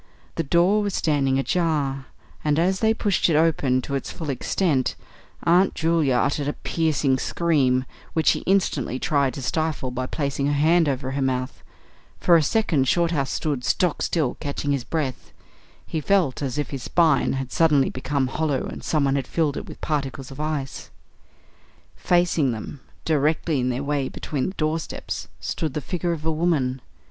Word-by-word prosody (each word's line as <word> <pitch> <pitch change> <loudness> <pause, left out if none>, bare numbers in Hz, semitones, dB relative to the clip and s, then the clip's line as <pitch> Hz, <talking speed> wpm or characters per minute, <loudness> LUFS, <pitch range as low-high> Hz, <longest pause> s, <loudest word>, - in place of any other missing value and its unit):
The - - -1
door 175 +7 +3
was 205 -2 -2
standing 140 -4 +1
ajar, 140 -3 0 0.4
and 150 -1 +1
as 185 +3 +2
they 220 0 +3
pushed 205 -5 +1
it 160 - +2
open 145 -5 +2
to 140 - -5
its 135 - -2
full 155 -4 -4
extent 135 +1 0 0.5
Aunt 180 +3 +4
Julia 160 -5 +2
uttered 145 +3 +1
a 145 - 0
piercing 150 -5 0
scream, 135 -7 +1 0.3
which 160 -2 0
she - - +2
instantly 160 -10 +1
tried 140 -2 +1
to 140 - -6
stifle 155 -3 -1
by 130 +1 -3
placing 140 -1 -2
her 145 - +1
hand 160 +2 +3
over 130 -1 -2
her 140 +1 -2
mouth. 130 -1 -2 0.6
For 175 - +5
a 165 - +6
second 155 -5 +1
Shorthouse 165 -3 +1
stood 145 -5 -2
stock 175 +4 +1
still, 155 -7 0
catching 145 -1 -3
his 140 -3 0
breath. 140 -3 -3 0.5
He 160 - -3
felt 175 -6 +1
as 140 0 -2
if 150 - -2
his 135 -2 -4
spine 160 0 +2
had 135 -1 -4
suddenly 150 -4 +3
become 135 +1 -1
hollow 140 0 -1
and - - -7
someone 140 -3 +1
had 135 -3 -2
filled 155 -4 0
it - - -6
with - - -11
particles 135 -3 -3
of 135 - -10
ice. 150 -3 -3 1.1
Facing 175 -7 +2
them, 115 +5 -7 0.3
directly 155 0 +1
in 125 0 0
their 125 +2 -2
way 140 -2 -1
between 140 -4 -3
the 190 - -5
doorposts, 155 0 -3
stood 155 -5 -3
the - - 0
figure 175 +4 -2
of 160 -2 -4
a 160 - +2
woman. 150 -6 0
145 Hz, 175 wpm, -24 LUFS, 135-165 Hz, 1.1 s, a